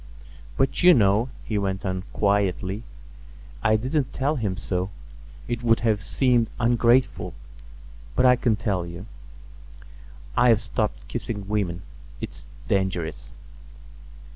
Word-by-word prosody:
"But, 135 - +1
you 180 0 +8
know," 105 +2 +3
he 105 -2 -1
went 95 0 -2
on 95 -1 -2
quietly, 100 -1 0 0.8
"I 110 - +3
didn't 130 +5 -1
tell 140 +3 0
him 105 -8 -2
so, 90 0 -2 0.6
it 120 -1 -2
would 115 -1 +3
have 110 -3 +1
seemed 120 -1 +2
ungrateful, 120 +1 +2 0.8
but 125 - +3
I 125 0 +7
can 120 -2 +1
tell 100 -4 -1
you. 85 +3 -8 1.3
I've 120 -3 +5
stopped - - -3
kissing 105 -4 -5
women; 95 -4 -1 0.4
it's - - -8 0.2
dangerous." 95 -4 -1
110 Hz, 115 wpm, -25 LUFS, 95-120 Hz, 1.3 s, you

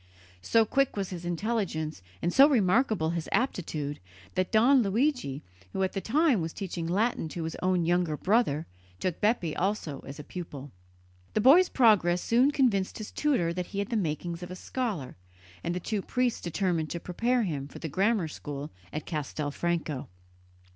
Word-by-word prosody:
So 225 - +3
quick 275 +1 +1
was 195 -2 -2
his 175 -1 -6
intelligence 175 - -2 0.2
and 175 - +1
so 275 +2 +8
remarkable 215 - +2
his 170 -2 -3
aptitude 155 - -1 0.3
that 185 -1 0
Don 250 +5 +5
Luigi, 215 - 0 0.3
who 190 - 0
at 190 - -1
the 195 - -2
time 275 - +3
was 160 0 -3
teaching 175 -4 -4
Latin 200 -1 0
to 165 +1 -5
his 160 0 -4
own 180 -2 +2
younger 175 -3 +1
brother, 185 -7 +2 0.3
took 180 -3 -2
Bepi 210 -7 +1
also 185 -7 -1
as 140 +2 -9
pupil. 145 -6 -7 0.6
The 215 - +3
boy's 325 - +7
progress 205 -8 +4
soon 245 +4 +4
convinced 245 -10 +1
his 215 - -7
tutor 240 - +1
that 180 0 -3
he 200 - -8
had 200 0 -1
the 235 - -1
makings 170 -2 -2
of 175 - -7
a 180 - -6
scholar, 190 - -4 0.5
and 175 - -1
the - - -1
two 205 +3 -2
priests 250 +3 0
determined 170 -2 -1
to 170 - -3
prepare 235 +8 0
him 145 -8 -3
for 140 - -11
the 165 - -5
grammar 195 +3 +1
school 145 -1 -6 0.2
at 155 - -5
Castelfranco. 150 -1 -2
180 Hz, 170 wpm, -28 LUFS, 160-225 Hz, 0.6 s, so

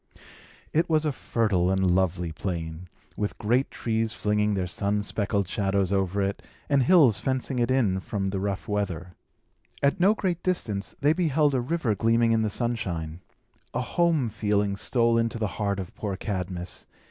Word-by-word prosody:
It 165 +3 +2
was 155 -1 +2
a 150 - +2
fertile 105 -9 0
and 95 -1 +2
lovely 90 -2 0
plain, 80 0 -5 0.3
with 105 -1 -3
great 120 +5 +1
trees 110 -1 -1
flinging 105 -1 +1
their 95 -2 0
sun 100 +3 -1
speckled 100 -2 -1
shadows 95 0 0
over 95 0 +1
it, 100 +1 -2 0.3
and 140 -2 +3
hills 130 - +5
fencing 130 +1 -1
it 120 0 +1
in 115 -8 +2
from 95 +1 -3
the 95 0 -1
rough 100 0 -3
weather. 95 -4 -2 0.7
At 140 +7 +3
no 195 +5 +5
great 180 -5 -1
distance, 110 - -2
they 145 +2 +4
beheld 155 -4 +2
a 130 - +1
river 135 -3 0
gleaming 115 +2 +2
in 115 -1 +3
the 110 - +1
sunshine. 90 -9 -2 0.5
A 125 - +1
home 160 -2 +1
feeling 105 -2 0
stole 115 +2 +2
into 115 0 -1
the 110 - -1 0.2
heart 100 -1 0
of 95 -2 -6
poor 100 -3 -4
Cadmus. 90 -3 -4
105 Hz, 170 wpm, -26 LUFS, 95-125 Hz, 0.7 s, hills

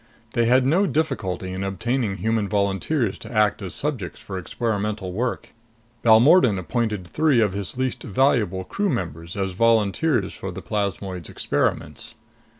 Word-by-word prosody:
They 120 -2 +2
had 125 +2 +4
no 180 +9 +3
difficulty 95 - -2
in 95 +1 -3
obtaining 100 +2 -1
human 110 -2 0
volunteers 100 +4 0
to - - -10
act 105 -2 +2
as 95 -3 -6
subjects 130 - -3
for 95 -2 -6
experimental 105 -2 -2
work. 120 +5 -3 0.5
Balmordan 120 - +6
appointed 105 0 -2
three 150 - +2
of 105 -4 +2
his 100 +4 -5
least 130 -1 -2
valuable 105 -5 +1
crew 200 - -1
members 85 - -4
as 95 -1 -1
volunteers 115 - +2
for 95 - -6
the 90 +1 -8
plasmoid's 95 -4 -3
experiments. - - -2
105 Hz, 145 wpm, -23 LUFS, 95-125 Hz, 0.5 s, Balmordan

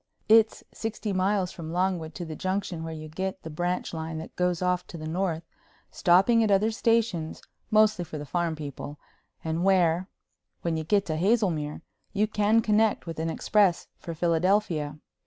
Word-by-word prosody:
It's 220 0 +5
sixty 220 -2 -3
miles 190 0 +1
from 160 -2 -7
Longwood 175 -3 -1
to 175 - -5
the 160 -1 -6
Junction 185 -3 -2
where 165 - -5
you 155 -1 -7
get 190 +4 -4
the 160 - -7
branch 175 +4 -2
line 160 0 -4
that 160 - -8
goes 180 -1 +1
off 180 0 0
to 170 - -8
the 155 - -7
North, 170 -1 -1 0.5
stopping 195 +6 +4
at 220 - +1
other 205 +3 +3
stations, 225 -8 0 0.3
mostly 215 -4 +4
for 160 -2 -7
the 150 - -6
farm 170 +1 -1
people, 145 -1 -7 0.5
and 160 +2 -1
where, 185 -1 +3 0.5
when 170 -1 0
you 160 - -2
get 200 +5 +2
to 155 -1 -2
Hazelmere, 170 -7 +1 0.3
you 210 +1 +2
can 215 +1 +2
connect 215 0 +2
with 165 -2 -6
an 165 +1 -1
express 195 +1 +2
for 170 - -6
Philadelphia. 165 -2 +1
180 Hz, 175 wpm, -27 LUFS, 160-205 Hz, 0.5 s, It's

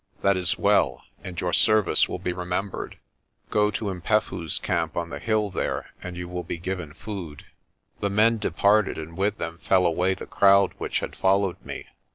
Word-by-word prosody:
That 100 0 +4
is 90 -2 0
well, - - +2 0.2
and 90 -2 -6
your 90 -1 -1
service 110 -4 +4
will - - -3
be 90 -1 -3
remembered. 90 +2 -3 0.5
Go 105 0 +3
to 105 - -3
'Mpefu's 90 -3 -1
camp 80 -3 -1
on 85 -1 -2
the - - -5
hill 110 -3 0
there - - -3
and 90 -1 -7
you 90 0 -5
will 90 0 -4
be 85 - -5
given 90 -3 -4
food." 90 -8 -7 0.5
The 100 - 0
men 110 +3 +3
departed 105 -1 +2
and 80 +1 -7
with 100 +3 0
them 85 0 -5
fell 90 +3 +3
away 90 +3 +2
the - - -8
crowd 100 -1 +4
which - - -1
had - - -5
followed 95 -2 +1
me. - - -7
95 Hz, 185 wpm, -25 LUFS, 85-100 Hz, 0.5 s, That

